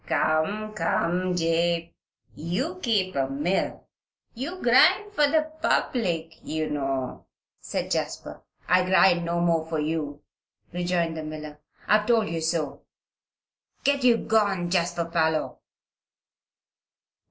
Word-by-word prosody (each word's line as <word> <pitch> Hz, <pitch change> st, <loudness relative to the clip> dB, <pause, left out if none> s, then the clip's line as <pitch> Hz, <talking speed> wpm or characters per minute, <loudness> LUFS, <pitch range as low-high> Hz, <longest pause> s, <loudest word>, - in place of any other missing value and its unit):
"Come, 205 Hz, +8 st, 0 dB
come, 180 Hz, 0 st, 0 dB
Jabe! 170 Hz, 0 st, 0 dB, 0.4 s
you 255 Hz, -, -3 dB
keep 200 Hz, -, 0 dB
a 135 Hz, -1 st, +1 dB
mill. 150 Hz, +8 st, -1 dB, 0.5 s
You 290 Hz, +10 st, -5 dB
grind 375 Hz, -, +4 dB
for 295 Hz, -7 st, +4 dB
the 310 Hz, +1 st, +1 dB
public, 165 Hz, -9 st, 0 dB
you 155 Hz, -1 st, -3 dB
know," 135 Hz, -3 st, -3 dB, 0.3 s
said -, -, -4 dB
Jasper. -, -, -3 dB, 0.3 s
"I 180 Hz, 0 st, +4 dB
grind 185 Hz, -1 st, +4 dB
no 170 Hz, 0 st, -1 dB
more 165 Hz, -2 st, +2 dB
for 160 Hz, -1 st, -3 dB
you," 150 Hz, -1 st, -3 dB, 0.5 s
rejoined 175 Hz, -2 st, -1 dB
the 160 Hz, -, -4 dB
miller. 155 Hz, -1 st, -8 dB, 0.3 s
"I 210 Hz, -, +5 dB
have 210 Hz, -, -7 dB
told 225 Hz, -3 st, +3 dB
you 165 Hz, -1 st, -3 dB
so. 160 Hz, -4 st, -2 dB, 1.0 s
Get 280 Hz, -1 st, +2 dB
you 240 Hz, -2 st, +5 dB
gone, 200 Hz, -6 st, +1 dB
Jasper 170 Hz, -2 st, 0 dB
Parloe." 160 Hz, -2 st, 0 dB
175 Hz, 120 wpm, -26 LUFS, 160-215 Hz, 1.0 s, I